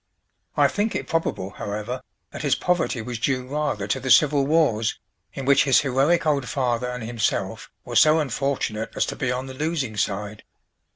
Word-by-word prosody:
I 145 -1 +6
think 205 +9 -1
it - - -2
probable, 160 - -2
however, 105 +6 -5 0.3
that - - -7
his - - +2
poverty 175 -9 0
was 120 -1 -5
due 130 0 0
rather 145 -7 -2
to 100 +6 -1
the 130 +1 -4
civil 140 0 +5
wars, 140 -9 +2 0.4
in 135 - -5
which 140 0 +5
his 135 -3 +5
heroic 140 +6 +2
old 140 -4 +1
father 125 -2 -1
and 125 -1 -5
himself 115 -1 -2 0.2
were - - -6
so 155 +1 +6
unfortunate 135 -6 -2
as - - +1
to - - -5
be 125 -3 -1
on 125 +1 -3
the 130 - -8
losing 145 -5 -2
side. 105 +1 -3
130 Hz, 180 wpm, -24 LUFS, 115-145 Hz, 0.4 s, I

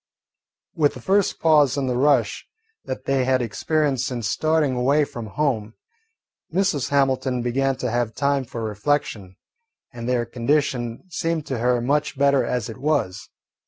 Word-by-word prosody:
With 150 -4 +1
the - - -8
first 195 0 +1
pause 150 -4 +4
in 140 - 0
the 125 -1 -1
rush 125 -5 +2 0.4
that 130 - -5
they 135 -1 +1
had 130 0 +2
experienced 135 +3 0
since 120 -4 -3
starting 155 +1 +1
away 140 +4 +2
from 120 -5 -7
home, 115 -2 -1 0.8
Mrs. 180 -6 0
Hamilton 130 -3 +1
began 135 +2 0
to 125 -2 -3
have 120 -1 -1
time 140 -1 +1
for 115 -1 -6
reflection, 105 -3 -2 0.6
and 120 0 -5
their 120 -2 +1
condition 120 0 -1
seemed 165 -2 -2
to 130 -4 -3
her 125 0 +2
much 145 +3 0
better 140 0 +3
as 125 -4 -2
it 115 - -8
was. 130 -11 -1
130 Hz, 155 wpm, -23 LUFS, 120-145 Hz, 0.8 s, pause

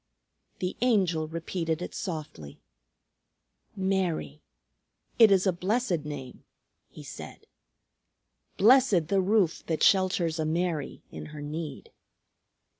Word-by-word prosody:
The 180 0 -3
Angel 185 -10 +2
repeated 165 0 -3
it 180 - -6
softly. 150 - -6 1.2
"Mary. 190 -6 -1 0.8
It 225 -2 +9
is 195 -1 +3
a 190 - +3
blessed 185 -2 -1
name," 140 -4 -8 0.5
he - - -12
said. - - -10 1.1
"Blessed 215 - +5
the 195 -1 +3
roof 190 -3 +1
that 160 -2 -1
shelters 180 -4 +3
a 155 - 0
Mary 165 -2 -2
in - - -8
her 150 -1 -9
need." 150 -1 -6
175 Hz, 110 wpm, -28 LUFS, 155-195 Hz, 1.2 s, It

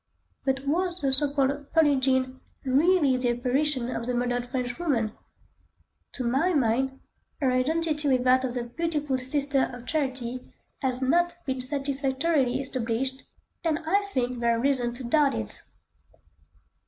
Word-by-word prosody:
But 270 0 -1
was 350 +4 0
the 275 -2 0
so 275 +2 +7
called 280 0 -1
"Pearlin' 295 -5 +4
Jean" 260 0 +1 0.3
really 285 0 +3
the 250 -1 0
apparition 255 +1 0
of 230 - -4
the 250 - -1
murdered 245 0 -1
French 250 +1 -3
woman? 245 -11 0 1.0
To 255 - -4
my 275 +9 +1
mind, 265 +1 +1 0.4
her 265 -4 +2
identity 300 +3 0
with 255 -2 +2
that 255 +1 +4
of 255 -1 -3
the 245 - -2
beautiful 295 +1 -2
Sister 275 +1 +1
of 245 0 -10
Charity 255 -5 -3 0.3
has 260 -1 -1
not 345 +6 +2
been 265 -2 -2
satisfactorily 270 0 0
established, 260 0 -2 0.4
and 320 -3 +1
I 400 +5 +2
think 250 -3 -1
there 235 -1 +2
are - - -2
reasons 245 -2 0
to 260 - -7
doubt 280 +3 +2
it. - - -5
265 Hz, 150 wpm, -26 LUFS, 250-290 Hz, 1.0 s, so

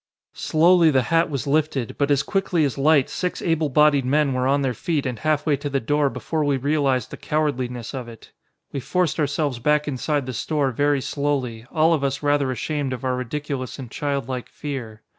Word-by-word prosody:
Slowly 170 +1 +4
the 130 -4 +3
hat 165 +1 +4
was 140 -2 -3
lifted, 145 -4 0
but 140 0 +2
as 140 -1 +3
quickly 190 -5 +1
as 135 - -2
light 145 -1 +4
six 180 -1 -3
able 165 -3 0
bodied 145 0 +4
men 140 +2 +2
were 130 0 0
on 140 +1 +2
their 130 -2 0
feet 150 +5 -2
and 125 -4 -3
half 155 +1 0
way 150 -3 +3
to 145 +2 -4
the 140 0 0
door 145 +4 +1
before 155 +3 -2
we 145 -2 +1
realized 135 -3 0
the - - -7
cowardliness 130 -6 -2
of 130 -3 -5
it. 115 -2 -13 0.4
We 140 - -3
forced 175 +4 0
ourselves 145 -3 0
back 150 +4 +2
inside 145 +1 -1
the 130 - -5
store 140 +2 0
very 145 +2 +1
slowly, 130 -6 -2
all 160 0 +3
of 150 -4 0
us 140 +1 -1
rather 145 -2 +2
ashamed 135 +2 -2
of 125 - -6
our 130 -1 +1
ridiculous 130 +1 -4
and 130 -4 -8
childlike 135 -3 -3
fear. 120 -7 -6
140 Hz, 200 wpm, -23 LUFS, 130-150 Hz, 0.4 s, Slowly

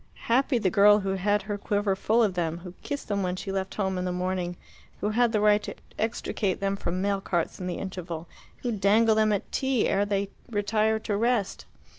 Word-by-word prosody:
Happy 255 +2 +3
the 195 -5 +1
girl 205 0 +6
who 195 - -2
had 205 +2 +1
her 205 -1 -4
quiver 205 -1 0
full 225 +4 +2
of 205 -4 +1
them, 170 -2 -1
who 180 -2 -8
kissed 285 0 -5
them 200 -1 0
when 180 -1 -1
she 195 +1 -5
left 190 0 -3
home 190 -3 -1
in - - -2
the 180 - -1
morning, 180 -1 -2 0.4
who 210 - 0
had 235 +1 +3
the 215 - +1
right 210 0 +4
to - - -6 0.2
extricate 215 -3 -1
them 195 0 0
from 185 -1 -3
mail 200 -1 0
carts 175 -4 -2
in 180 - -4
the 180 - -3
interval, 175 -3 -6 0.4
who 245 - 0
dangled 215 +2 +3
them 215 0 +3
at 205 - -2
tea 265 -4 +1
ere 200 - +2
they 200 -1 -1 0.2
retired 215 0 +1
to 210 - -1
rest! 230 -2 0
200 Hz, 215 wpm, -27 LUFS, 190-215 Hz, 0.4 s, girl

